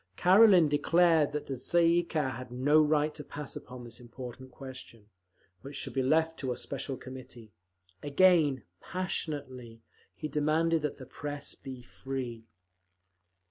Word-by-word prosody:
Karelin 185 Hz, -2 st, +7 dB
declared 160 Hz, +1 st, +3 dB
that 150 Hz, 0 st, -3 dB
the 135 Hz, -, -4 dB
Tsay 170 Hz, +7 st, +2 dB
ee 170 Hz, +1 st, +4 dB
kah 155 Hz, -5 st, -1 dB
had 125 Hz, 0 st, -8 dB
no 145 Hz, +5 st, +4 dB
right 150 Hz, 0 st, +2 dB
to 150 Hz, -, -7 dB
pass 145 Hz, -1 st, -7 dB
upon 125 Hz, 0 st, -9 dB
this 120 Hz, 0 st, -8 dB
important 125 Hz, +1 st, -9 dB
question, 125 Hz, -5 st, -11 dB, 0.5 s
which 140 Hz, +1 st, -9 dB
should -, -, -4 dB
be 135 Hz, -, +1 dB
left 160 Hz, +5 st, +2 dB
to 130 Hz, -3 st, -2 dB
a 125 Hz, -, -3 dB
special 135 Hz, -1 st, -4 dB
committee. 125 Hz, -4 st, -11 dB, 0.5 s
Again, 145 Hz, -, +4 dB, 0.2 s
passionately, 135 Hz, -10 st, -5 dB, 0.3 s
he -, -, -4 dB
demanded 155 Hz, +2 st, +1 dB
that 150 Hz, -1 st, -3 dB
the 130 Hz, -, -9 dB
Press 145 Hz, +2 st, -6 dB
be 130 Hz, -2 st, -9 dB
free. 125 Hz, -3 st, -6 dB
140 Hz, 145 wpm, -30 LUFS, 130-155 Hz, 0.5 s, Karelin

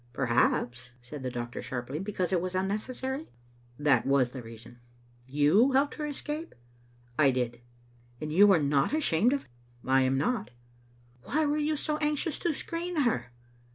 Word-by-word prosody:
" 120 Hz, -, -31 dB
Perhaps," 120 Hz, -1 st, +1 dB
said 125 Hz, +4 st, -9 dB
the 130 Hz, -, -2 dB
doctor, 120 Hz, 0 st, -5 dB
sharply, 130 Hz, +3 st, -4 dB
"because 190 Hz, -2 st, -2 dB
it 175 Hz, -, +2 dB
was 185 Hz, 0 st, -3 dB
unnecessary?" 255 Hz, +9 st, -2 dB, 0.5 s
"That 145 Hz, -5 st, +3 dB
was 135 Hz, -3 st, +2 dB
the 130 Hz, -, -7 dB
reason." 115 Hz, +1 st, -12 dB, 0.3 s
" 120 Hz, 0 st, -31 dB
You 205 Hz, -, +5 dB
helped 275 Hz, +2 st, +3 dB
her 300 Hz, -, -4 dB
to -, -, -3 dB
escape?'* 300 Hz, +3 st, -5 dB, 0.6 s
"I 140 Hz, -3 st, +6 dB
did." 120 Hz, -2 st, -2 dB, 0.3 s
" 120 Hz, 0 st, -31 dB
And 155 Hz, 0 st, -4 dB
you 200 Hz, +4 st, +7 dB
are 190 Hz, -, +6 dB
not 140 Hz, -, +1 dB
ashamed 245 Hz, -, +3 dB
of 280 Hz, 0 st, 0 dB
it? -, -, -26 dB, 0.3 s
"I 130 Hz, 0 st, +4 dB
am 130 Hz, +1 st, +2 dB
not." 205 Hz, -, 0 dB, 0.4 s
" 120 Hz, 0 st, -31 dB
Why 310 Hz, +2 st, +1 dB
were 295 Hz, +1 st, +1 dB
you 305 Hz, +1 st, +1 dB
so 300 Hz, +1 st, -2 dB
anxious 300 Hz, 0 st, -1 dB
to 345 Hz, -, 0 dB
screen 335 Hz, +2 st, -3 dB
her?' 125 Hz, -, 0 dB
150 Hz, 185 wpm, -29 LUFS, -, 0.6 s, you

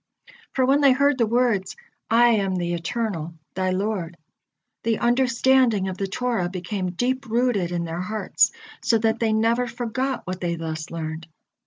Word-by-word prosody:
For 260 Hz, -, +2 dB
when 275 Hz, +3 st, +3 dB
they 275 Hz, -2 st, +6 dB
heard 280 Hz, 0 st, +2 dB
the 230 Hz, -, +3 dB
words, 235 Hz, -4 st, +1 dB, 0.3 s
"I 240 Hz, +1 st, +5 dB
am 200 Hz, -5 st, +1 dB
the 175 Hz, -1 st, -1 dB
Eternal, 170 Hz, -3 st, -3 dB, 0.2 s
thy 185 Hz, 0 st, -1 dB
Lord," 185 Hz, -3 st, -2 dB, 0.6 s
the 225 Hz, -1 st, 0 dB
understanding 250 Hz, -3 st, +3 dB
of 185 Hz, -, -6 dB
the 195 Hz, -, -1 dB
Torah 225 Hz, -3 st, -1 dB
became 185 Hz, 0 st, -4 dB
deep 255 Hz, +6 st, -1 dB
rooted 225 Hz, -6 st, +1 dB
in 175 Hz, -1 st, -1 dB
their 165 Hz, +1 st, -4 dB
hearts, 210 Hz, +1 st, +1 dB, 0.3 s
so 230 Hz, -, +3 dB
that 225 Hz, +1 st, +1 dB
they 225 Hz, -1 st, +1 dB
never 230 Hz, +3 st, +2 dB
forgot 245 Hz, +3 st, -3 dB
what 185 Hz, 0 st, -5 dB
they 170 Hz, -1 st, -1 dB
thus 160 Hz, -1 st, -5 dB
learned. 160 Hz, 0 st, -5 dB
215 Hz, 165 wpm, -24 LUFS, 180-245 Hz, 0.6 s, they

